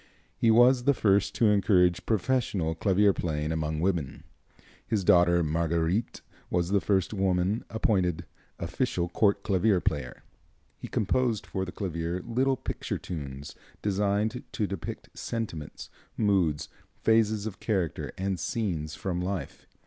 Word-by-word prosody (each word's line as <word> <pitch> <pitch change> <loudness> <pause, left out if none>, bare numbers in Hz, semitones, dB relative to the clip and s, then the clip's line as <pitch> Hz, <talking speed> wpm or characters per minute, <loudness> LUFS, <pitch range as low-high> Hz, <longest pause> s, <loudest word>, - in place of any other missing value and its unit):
He 115 - +2
was 120 +2 +5
the 140 -1 +4
first 100 -3 +2
to 115 - +3
encourage 90 -3 +3
professional 110 -6 0
clavier 100 +4 +3
playing 75 -3 -2
among 80 -1 -2
women. 85 -7 -1 0.6
His 105 -4 0
daughter 85 -1 +5
Marguerite 85 +6 0 0.3
was 90 -1 0
the 100 0 +2
first 95 0 +1
woman 95 +2 +1
appointed 90 -6 0 0.3
official 85 0 -1
court 100 +3 +2
clavier 100 0 +2
player. 70 -7 -3 0.6
He - - -7
composed 115 +1 0
for 95 0 -3
the 90 - -7
clavier 85 -2 -3
little 130 +3 +1
picture - - -4
tunes, 70 -4 -7 0.3
designed 105 +4 0
to 105 - 0
depict 95 -4 -6
sentiments, 95 -10 -5 0.3
moods, 95 -9 +1 0.4
phases 110 -2 +3
of 110 -2 -6
character 95 -7 -1
and 95 -1 -2
scenes 80 -6 -2
from 90 0 -3
life. 90 -5 -4
95 Hz, 130 wpm, -28 LUFS, 85-110 Hz, 0.6 s, was